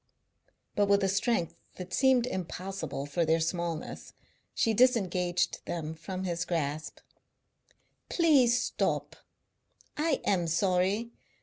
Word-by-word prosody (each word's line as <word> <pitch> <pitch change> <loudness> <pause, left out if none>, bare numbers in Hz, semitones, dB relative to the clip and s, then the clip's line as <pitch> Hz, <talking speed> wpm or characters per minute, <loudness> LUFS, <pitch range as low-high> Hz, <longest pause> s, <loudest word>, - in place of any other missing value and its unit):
But 205 0 +3
with 200 0 +3
a - - +3
strength 195 -3 0 0.2
that 180 -1 -8
seemed 260 0 +4
impossible 180 - -4
for 145 +4 0
their 160 +1 +2
smallness 170 -1 -3 0.4
she 225 - +2
disengaged 185 -7 +2
them 160 -2 -3
from 185 +4 -6
his 175 -2 -1
grasp. 155 -3 -3 1.1
"Please 275 -8 +4
stop. - - -1 0.8
I 300 -2 0
am 175 -4 +1
sorry. 190 +6 +1
185 Hz, 110 wpm, -29 LUFS, 170-225 Hz, 1.1 s, seemed